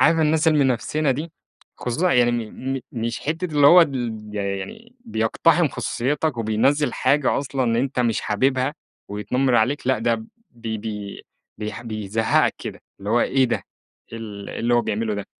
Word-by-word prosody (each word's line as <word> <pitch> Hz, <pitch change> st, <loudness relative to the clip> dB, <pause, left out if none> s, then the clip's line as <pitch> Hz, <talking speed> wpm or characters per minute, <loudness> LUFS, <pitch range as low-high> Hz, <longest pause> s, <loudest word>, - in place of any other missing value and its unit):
عارف 165 Hz, -, +5 dB
الناس 160 Hz, +1 st, +3 dB
المنفسنة 140 Hz, 0 st, +2 dB
دي؟ 155 Hz, +5 st, -3 dB, 0.4 s
خصوصًا 160 Hz, +9 st, 0 dB
يعني 120 Hz, -1 st, +4 dB, 0.2 s
م 135 Hz, +1 st, -4 dB
م -, -, -4 dB
مش 115 Hz, 0 st, -3 dB
حتّة 160 Hz, +4 st, -2 dB
اللي 145 Hz, -1 st, +6 dB
هو 175 Hz, +5 st, +9 dB
ال 125 Hz, -8 st, 0 dB, 0.2 s
يعني 100 Hz, -, -5 dB
بيقتحم 110 Hz, -, +2 dB
خصوصيتك 145 Hz, +2 st, -1 dB
وبينزِّل 115 Hz, +7 st, +2 dB
حاجة 145 Hz, -1 st, +2 dB
أصلًا 130 Hz, -4 st, 0 dB
أنت 130 Hz, -1 st, -1 dB
مش 115 Hz, -3 st, +1 dB
حاببها 130 Hz, +6 st, +1 dB, 0.3 s
ويتنمر 125 Hz, +6 st, 0 dB
عليك، 125 Hz, +4 st, +1 dB
لأ 130 Hz, -3 st, +2 dB
ده 115 Hz, -1 st, 0 dB, 0.3 s
بي 115 Hz, -2 st, -5 dB
بي 105 Hz, -2 st, -6 dB, 0.4 s
بيح 105 Hz, +2 st, -5 dB
بيزهقك 110 Hz, -1 st, +1 dB
كده، -, -, -7 dB, 0.2 s
اللي 100 Hz, +2 st, -5 dB
هو 120 Hz, -, +4 dB
إيه 135 Hz, +1 st, +3 dB
ده! 120 Hz, -, +1 dB, 0.6 s
إيه 115 Hz, -, -5 dB
ال 105 Hz, -3 st, -7 dB
اللي 120 Hz, +1 st, 0 dB
هو 120 Hz, -, +5 dB
بيعمله 110 Hz, -1 st, -2 dB
ده! 100 Hz, -1 st, -5 dB
120 Hz, 160 wpm, -23 LUFS, 110-145 Hz, 0.6 s, هو